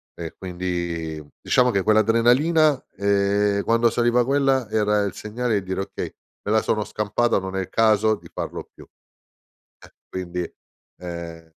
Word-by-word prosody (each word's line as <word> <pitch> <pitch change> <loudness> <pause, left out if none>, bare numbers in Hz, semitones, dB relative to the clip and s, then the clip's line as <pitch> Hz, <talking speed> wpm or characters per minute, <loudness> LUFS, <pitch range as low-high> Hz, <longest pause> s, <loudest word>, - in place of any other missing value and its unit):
e 85 -2 -7
quindi, 85 -3 -4 0.2
diciamo 125 0 +3
che 100 - +1
quell'adrenalina, 120 +8 +3
ehm, 100 0 +2
quando 115 0 +3
saliva 120 +1 +2
quella 135 -3 +1
era 105 -1 +2
il 100 - -2
segnale 110 +1 -2
di - - -13
dire: 95 +1 -2
“Okay, - - -6 0.3
me 105 - -1
la 110 0 +4
sono 105 -1 0
scampata, 105 +3 0
non 95 0 -6
è - - 0
il 95 - -6
caso 110 -1 +3
di - - -15
farlo - - -5
più." - - -13
E - - -42 1.0
quindi, 90 -1 -5 0.5
ehm 85 -2 -7
105 Hz, 150 wpm, -23 LUFS, 95-115 Hz, 1.0 s, la